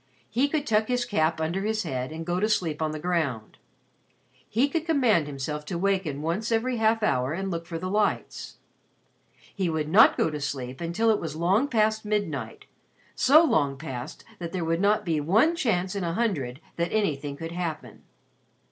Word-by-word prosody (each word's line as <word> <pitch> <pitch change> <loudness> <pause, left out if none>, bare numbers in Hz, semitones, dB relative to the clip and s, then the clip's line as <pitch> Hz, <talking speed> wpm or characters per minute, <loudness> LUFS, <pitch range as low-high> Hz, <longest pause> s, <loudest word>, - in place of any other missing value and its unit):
He 255 +6 +2
could 300 -1 -1
tuck 215 -2 +2
his 245 -1 0
cap 160 -8 +1
under 165 +4 -1
his 215 +1 -1
head 130 +1 -3
and 165 +1 -6
go 175 +1 -1
to 215 +3 +1
sleep 165 -7 0
on 155 - +1
the 155 - -4
ground. 150 -10 -2 0.9
He 245 +6 +2
could 320 +2 -2
command 240 - +3
himself 150 +1 -4
to 175 - -4
waken 180 -6 -1
once 190 +8 -2
every 240 +2 +1
half 220 0 +2
hour 130 -7 +1
and 190 +3 -3
look 170 -1 -4
for 165 - -4
the 185 +3 -4
lights. 210 +2 -1 1.0
He 190 -4 -1
would 160 -2 -1
not 200 +8 +6
go 160 - +1
to 150 -1 -5
sleep 130 -1 -4
until 175 +7 +1
it 215 - 0
was 155 -3 -5
long 190 - +2
past 220 -3 +1
midnight 165 - -3 0.5
so 305 +5 +6
long 145 - +1
past 130 -5 -7 0.2
that 170 -1 -5
there 180 -3 -2
would 165 +2 0
not 205 +1 +2
be 160 -3 0
one 220 - +3
chance 200 - 0
in 195 - -2
a 170 -1 -1
hundred 160 - -1 0.2
that 170 0 -1
anything 145 -9 -1
could 165 +2 -6
happen. 160 - -5
175 Hz, 190 wpm, -26 LUFS, 155-215 Hz, 1.0 s, not